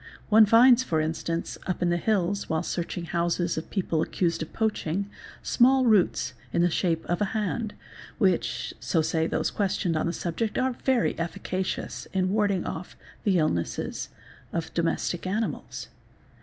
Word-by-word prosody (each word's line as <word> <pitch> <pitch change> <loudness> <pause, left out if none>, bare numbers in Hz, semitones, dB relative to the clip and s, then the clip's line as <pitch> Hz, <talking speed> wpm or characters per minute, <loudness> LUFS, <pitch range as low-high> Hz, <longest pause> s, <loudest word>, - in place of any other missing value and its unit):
One 215 0 +7
finds 240 +3 +7
for 165 -11 0
instance, 165 +2 -2
up 185 -1 -1
in 175 - +2
the 175 - +2
hills, 200 0 0
while 160 0 0
searching 170 0 -3
houses 170 0 0
of 160 - -5
people 175 -5 0
accused 170 0 0
of 160 - -5
poaching, 200 -4 -1 0.4
small 260 +1 +4
roots 190 - +3 0.2
in 170 - +2
the 175 - +3
shape 165 -2 0
of 175 +2 -1
a - - +4
hand 215 +1 -2 0.4
which, 190 -7 +1
so 165 -3 +1
say 160 +1 +1
those - - -1
questioned 190 -4 0
on 155 - 0
the - - 0
subject, 195 +7 -2
are 260 0 +1
very 255 -1 +1
efficacious 180 +2 -3
in 185 -1 +1
warding 205 -3 +1
off 175 +2 -6 0.3
the 195 -3 +3
illnesses 120 - -1 0.4
of 165 -1 -3
domestic 170 +1 -1
animals. 215 +4 -3
180 Hz, 155 wpm, -27 LUFS, 165-210 Hz, 0.4 s, One